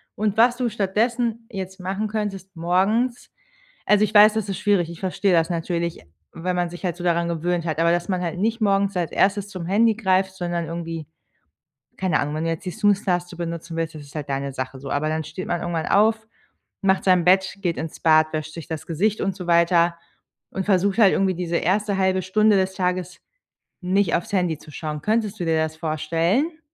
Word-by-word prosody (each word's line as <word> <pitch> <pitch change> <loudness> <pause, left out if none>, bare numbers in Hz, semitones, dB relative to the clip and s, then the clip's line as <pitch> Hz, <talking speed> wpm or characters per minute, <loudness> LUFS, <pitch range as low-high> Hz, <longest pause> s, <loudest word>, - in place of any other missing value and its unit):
und 210 -1 0
was 240 +2 +5
du 245 -1 0
stattdessen 230 +3 -1
jetzt 190 -1 -6
machen 195 +4 -2
könntest 195 -3 -4
morgens 195 +9 0 0.6
also, 210 0 +5
ich 210 - -2
weiß, 210 +1 +8
das 215 -2 -2
ist 190 - -3
schwierig. 195 -5 +1
Ich 170 - -10
verstehe 190 +1 0
das 165 -1 +3
natürlich, 170 0 -2 0.3
wenn 180 +2 -3
man 175 -1 0
sich 175 +2 -10
halt 175 -2 0
so 175 - -8
daran 170 -1 +1
gewöhnt 170 +1 -1
hat. 160 -2 -2
Aber 165 0 +3
dass 175 0 +1
man 185 -1 0
halt 175 0 -3
nicht 225 +4 0
morgens 200 -1 +2
als 170 -2 -1
Erstes 200 +1 +2
zum 185 -4 -7
Handy 220 +5 +3
greift, 190 -3 +1
sondern 175 -2 -2
irgendwie, 165 -1 -5 0.9
keine 185 -4 +1
Ahnung 145 +1 -2
wenn 155 +1 -2
du - - 0
jetzt 165 +3 -4
die 180 - -3
Snooze 205 -1 +1
Taste 180 -1 -1
benutzen 170 -1 -5
willst, 165 -1 -2
das 155 - -9
ist 145 +1 -15
halt 150 -2 -5
deine 140 0 -2
Sache 130 0 -5
so. 140 +1 -8
Aber 145 +3 0
dann 160 0 -1
steht 185 +5 -7
man 175 - -1
irgendwann 170 -2 -2
auf, 220 +2 +2 0.5
macht 190 -1 +2
sein 180 -3 +3
Bett, 190 +2 +3
geht 175 -4 -1
ins 160 0 -6
Bad, 155 -1 +4
wäscht 155 0 -4
sich 165 -3 -8
das 160 -1 -6
Gesicht 200 +6 0
und 195 -1 -1
so 180 -2 -7
weiter 170 0 +3 0.5
und 190 - -4
versucht 195 0 +2
halt 205 -5 +6
irgendwie 190 -1 +1
diese 170 -1 -1
erste 200 +3 0
1/2 190 0 +1
Stunde 215 +3 +3
des 190 0 0
Tages 180 -1 -2 0.6
nicht 185 0 +1
aufs 205 +4 -3
Handy 180 -5 +1
zu 150 - -14
schauen. 150 0 -5
Könntest 215 -1 0
du 175 - -2
dir 165 -1 +2
das 160 0 -1
vorstellen? 165 - 0
180 Hz, 210 wpm, -23 LUFS, 165-200 Hz, 0.9 s, weiß